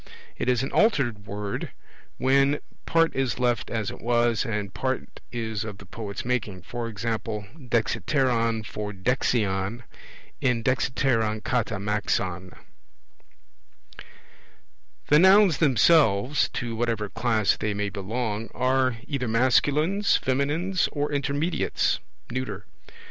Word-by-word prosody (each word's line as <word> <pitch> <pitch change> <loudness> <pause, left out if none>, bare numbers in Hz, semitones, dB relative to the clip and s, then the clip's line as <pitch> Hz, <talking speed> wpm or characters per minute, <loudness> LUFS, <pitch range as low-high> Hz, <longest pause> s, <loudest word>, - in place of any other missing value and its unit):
It 125 - -2
is 125 0 +2
an 135 - -3
altered 120 - +2
word, 100 0 -4 0.5
when 135 +2 +3 0.3
part 165 0 +3
is 135 -3 0
left 120 -1 0
as 110 -3 -2
it - - -11
was 120 +1 +2
and 105 -3 -3
part 130 +4 -3
is 110 -3 -3
of 105 -3 -7
the - - -13
poet's 105 -2 -6
making; 110 -7 -2
e.g. - - -24
dexiteron 115 +1 -1
for 105 0 -5
dexion, 105 0 0 0.6
in 125 -3 +1
dexiteron 115 -4 +1
kata 115 -3 0
maxon. 95 -3 -2 2.6
The 150 - +6
Nouns 190 -3 +6
themselves 140 -4 +4
(to 120 -2 -3
whatever 115 -2 -1
class 110 -1 +1
they 105 -2 -2
may 100 0 -1
belong) 110 +2 -3
are 130 -1 +1
either 135 -4 -2
masculines, 145 - +3
feminines, 150 +8 0
or 145 0 -2
intermediates 145 +4 0 0.3
(neuter). 105 -6 -4
120 Hz, 110 wpm, -26 LUFS, 105-135 Hz, 2.6 s, The